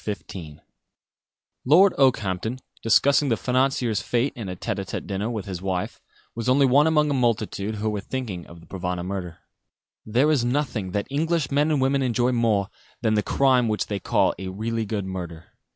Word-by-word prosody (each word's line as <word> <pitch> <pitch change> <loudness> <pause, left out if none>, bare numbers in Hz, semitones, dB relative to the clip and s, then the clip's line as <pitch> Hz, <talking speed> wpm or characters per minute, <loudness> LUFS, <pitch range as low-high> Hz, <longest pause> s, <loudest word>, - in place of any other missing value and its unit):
CHAPTER 105 -1 -4 0.2
XV 75 - -14 1.0
Lord 180 +8 +6
Okehampton, 110 -4 +1 0.2
discussing 140 +5 +4
the 115 - +2
financier's 125 -3 +1
fate 120 +3 0
in 110 -5 -6
a 90 - -4
tête - - -3
à - - -2
tête - - -5
dinner 100 +3 -2
with 110 -4 -4
his 95 -3 -6
wife, 95 -2 -3 0.3
was 115 +2 -3
only 135 +2 +5
one 140 +4 +5
among 150 -2 +3
a - - +2
multitude 110 -4 0
who 105 +1 -3
were 105 -2 -1
thinking 105 -8 -5
of 85 -1 -13
the - - -16
Provana 90 -2 -4
murder. 90 -3 -5 0.7
There 125 +8 +2
is 140 -6 +2
nothing 120 -6 -1
that 100 - -1
English 160 0 0
men 145 +2 +2
and 150 -3 +1
women 135 +1 +2
enjoy 125 -1 +1
more 110 -5 +1 0.3
than 110 -2 +2
the 105 - +3
crime 130 0 +2
which 110 -1 0
they 100 -2 -3
call - - +2
"a 95 - -5
really 110 +3 -3
good 100 -2 -2
murder." 85 -3 -6
115 Hz, 190 wpm, -24 LUFS, 100-135 Hz, 1.0 s, Lord